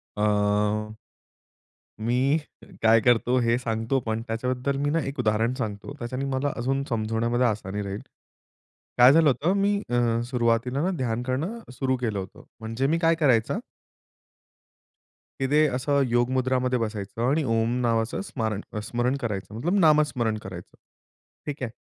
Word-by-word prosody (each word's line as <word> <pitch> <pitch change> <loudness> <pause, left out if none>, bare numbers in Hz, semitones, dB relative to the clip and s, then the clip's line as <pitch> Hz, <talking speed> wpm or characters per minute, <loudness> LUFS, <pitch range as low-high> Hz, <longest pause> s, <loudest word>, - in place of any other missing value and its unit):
अ. 105 +1 +1 1.1
मी 125 +6 +2 0.4
काय 115 +1 +6
करतो 120 +2 +3
हे 115 0 +2
सांगतो 115 +2 -1
पण 110 0 -1
त्याच्याबद्दल 125 +4 -2
मी 145 - +1
ना 165 +2 +1
1 140 +1 -6
उदाहरण 110 +1 +1
सांगतो. 110 -1 -5
त्याच्याने 130 +2 -4
मला 135 +1 -1
अजून 135 +3 -1
समजवण्यामध्ये 115 +1 0
आसानी 105 -2 -2
राहील. 100 0 -5 1.0
काय 125 +2 +9
झालं 160 0 +5
होतं 145 +7 +2
मी 200 +1 +2
अ, 120 -1 +2
सुरुवातीला 120 +1 +1
ना 185 - +1
ध्यान 120 -4 -1
करणं 145 - -2
सुरू 130 +1 0
केलं 110 -5 -1
होतं. 95 -1 -8 0.2
म्हणजे 115 +4 -2
मी 160 +4 +1
काय 165 0 +3
करायचा 130 -9 +2 1.8
की 135 - +1
ते 155 +1 +5
असं 140 +2 +1
योग 120 +1 +2
मुद्रामध्ये 130 -1 +1
बसायचं 110 -1 -4
आणि 150 +4 +2
ओम 115 0 +1
नावाचं 115 -2 0
स्मारण 110 - -3 0.2
स्मरण 120 +4 -1
करायचं 105 -4 -4
मतलब 175 - 0
नामस्मरण 150 - +3
करायचं. 95 -4 -10 0.7
ठीक 145 -2 -5
आहे. 120 - -2
120 Hz, 145 wpm, -25 LUFS, 110-135 Hz, 1.8 s, काय